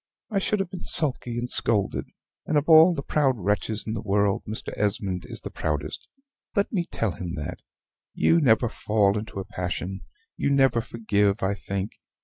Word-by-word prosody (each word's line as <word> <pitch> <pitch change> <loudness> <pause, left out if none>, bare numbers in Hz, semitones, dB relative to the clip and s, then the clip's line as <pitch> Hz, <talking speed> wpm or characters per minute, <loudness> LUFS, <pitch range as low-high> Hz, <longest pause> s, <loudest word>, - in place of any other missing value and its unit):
I 200 - +2
should 210 +2 0
have 195 -2 -2
been 185 - -7
sulky 125 -5 0
and 120 +1 -2
scolded; 105 -4 0 0.4
and 155 - +2
of 145 - +1
all 165 +2 +8
the 140 - -4
proud 135 -3 +2
wretches 105 +2 0
in 110 - -3
the 110 - -3
world 100 -2 +1
Mr. 110 +1 -2
Esmond 100 -3 -1
is - - -5
the - - -7
proudest, 75 -1 -3 0.5
let 200 -1 +1
me 175 -4 0
tell 115 -3 0
him 85 +2 -5
that. 75 - -5 0.6
You 165 - +4
never 120 -3 +4
fall 105 -2 +1
into 105 -1 -4
a 95 - -5
passion; 90 +1 -4
but 80 - -19 0.3
you - - +3
never 135 -4 +4
forgive, 105 -2 0
I 95 +1 +2
think. 100 0 -5
110 Hz, 185 wpm, -25 LUFS, 100-135 Hz, 0.6 s, all